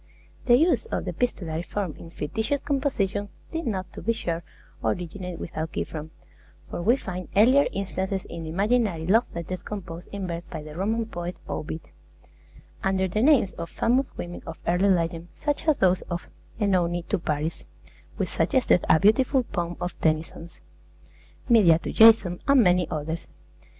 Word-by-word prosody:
The 240 - +7
use 335 - +3
of 455 - -3
the - - -2
epistolary 170 -10 -2
form 185 -2 -3
in 165 - -11
fictitious 220 - -2
composition 220 -9 -1 0.2
did 330 -3 -3
not, 185 -4 -3
to - - -8
be 230 - +1
sure, 170 -7 -3 0.4
originate 180 0 -3
with - - -7
Alciphron; 160 -1 -4 0.6
for - - -5
we 230 +8 +4
find 185 -6 -6
earlier 255 +8 +6
instances 190 0 -3
in 170 - -7
the 160 - -6
imaginary 200 -2 +1
love 225 +7 +4
letters 170 +2 -4
composed 180 -4 -7
in 200 -1 -4
verse 170 -1 -4
by 160 -3 -7
the 150 0 -10
Roman 220 +6 0
poet, 175 -4 -5
Ovid, 160 +1 -4 1.0
under 190 -1 +1
the 210 +4 -1
names 255 -8 +5
of 170 0 -4
famous 255 +3 +1
women 175 0 -6
of 165 - -6
early 180 +3 +3
legend, 170 -2 0
such 295 +1 -2
as 310 - +4
those 185 -1 +3
of 175 -1 -5 0.3
Oenone 175 -4 +1
to 205 - +1
Paris 155 0 -2 0.5
(which - - -1
suggested 255 -9 +2
a 160 - +6
beautiful 250 - +4
poem 175 -6 -3
of 175 0 -3
Tennyson's), 160 +1 -2 0.9
Medea 205 -9 +6
to - - -5
Jason, 220 -6 +6
and 275 -3 +6
many 180 -2 +3
others. 160 +1 -4
185 Hz, 160 wpm, -26 LUFS, 170-225 Hz, 1.0 s, The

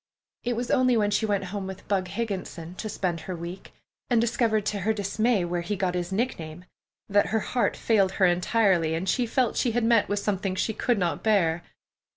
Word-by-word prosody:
It 245 0 -1
was 240 +2 -2
only 255 -2 +4
when 205 -1 +2
she 220 +1 +1
went 200 -2 0
home 200 -2 -3
with 190 -1 -9
"Bug" 190 -2 0
Higginson, 185 -5 -4
to 215 +4 -5
spend 180 -4 -2
her 180 +3 -6
week, 170 +3 -8 0.4
and 240 -2 +4
discovered 225 -2 +1
to 205 - -1
her 215 +4 +1
dismay 215 0 +1
where 175 0 -2
he 180 +5 -2
got 185 -2 -1
his 175 0 -3
nickname, 180 -6 -3 0.4
that 205 0 +3
her 220 0 0
heart 245 +2 0
failed 195 -4 +2
her 190 - +3
entirely, 180 -2 +2
and 175 +4 -3
she 240 +5 +1
felt 245 0 +1
she 240 - +1
had 240 0 +1
met 230 -2 +3
with 205 - 0
something 195 -2 -1
she 220 - -1
could 240 +2 +1
not 175 -3 -1
bear. 175 -6 +2
200 Hz, 205 wpm, -26 LUFS, 180-225 Hz, 0.4 s, only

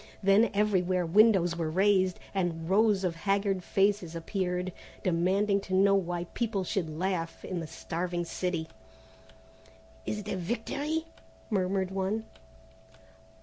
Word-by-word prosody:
Then 200 +3 +5
everywhere 185 -3 +2
windows 190 -1 +4
were 165 -2 -2
raised 190 +1 +2
and 170 -4 -1
rows 205 +1 +3
of 175 -2 0
haggard 195 0 0
faces 195 -4 +1
appeared 180 +1 -2 0.3
demanding 195 +3 +2
to 190 -1 -3
know 195 +1 +5
why 175 -3 0
people 215 -5 -1
should 180 -3 -2
laugh 165 +1 -3
in 185 - -3
the 165 - -5
starving 175 +2 -3
city. 170 -1 -2 1.4
"Is 210 - -1
it 210 -1 -7
a 195 - -2
victory?" 280 - -2 0.5
murmured 190 -1 0
one. 195 +3 -1
190 Hz, 125 wpm, -29 LUFS, 175-200 Hz, 1.4 s, Then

